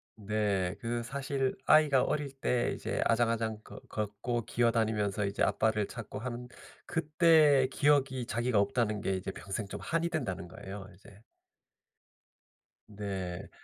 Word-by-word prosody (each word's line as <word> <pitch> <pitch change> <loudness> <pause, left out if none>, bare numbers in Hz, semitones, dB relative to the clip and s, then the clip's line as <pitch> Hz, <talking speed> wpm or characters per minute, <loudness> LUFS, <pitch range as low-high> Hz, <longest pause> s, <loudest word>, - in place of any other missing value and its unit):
네. 105 -3 -1
그 120 0 -2
사실 135 +1 -2
아이가 150 -4 +6
어릴 150 -2 -1
때 125 -3 0
이제 - - -3
아장아장 115 -2 +1
거 - - -11
걷고 110 +2 -3
기어다니면서 110 -4 +1
이제 100 - -1
아빠를 110 -2 +2
찾고 115 -4 -7
하는 125 +1 -5 0.4
그때 155 -4 +4
기억이 135 -4 +2
자기가 120 -2 +1
없다는 110 -2 +1
게 95 - 0
이제 95 +1 -4
평생 100 +2 -5
좀 - - -6
한이 165 +1 0
된다는 100 - -3
거예요, 95 +2 -8
이제. 100 +2 -17 1.7
네. 95 -4 -5
115 Hz, 275 characters per minute, -31 LUFS, 100-135 Hz, 1.7 s, 아이가